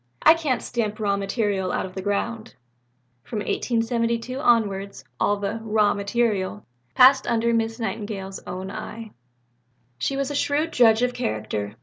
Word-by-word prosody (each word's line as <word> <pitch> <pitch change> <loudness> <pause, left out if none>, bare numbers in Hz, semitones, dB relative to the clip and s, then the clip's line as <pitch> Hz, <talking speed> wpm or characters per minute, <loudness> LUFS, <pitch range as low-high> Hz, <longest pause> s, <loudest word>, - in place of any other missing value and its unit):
I - - +9
can't 310 -6 -1
stamp 220 -3 -2
material 200 -1 0
out - - -1
of 185 - -9
the 190 - -5
ground." 215 - -3 0.7
From 220 - -6
1872 230 +3 -1
onwards 205 -7 +1 0.2
all 205 - +2
the 200 +3 -3
"raw 215 -1 +2
material" 205 -1 -1 0.3
passed 265 +1 +6
under 235 0 +1
Miss 225 0 0
Nightingale's 205 -4 -4
own 185 +1 -5
eye. 220 +1 -7 0.9
She 275 - -1
was 275 +1 -1
a - - -3
shrewd 295 +3 0
judge 230 -1 +5
of 250 0 +1
character. 110 - -3
225 Hz, 140 wpm, -24 LUFS, 200-240 Hz, 0.9 s, I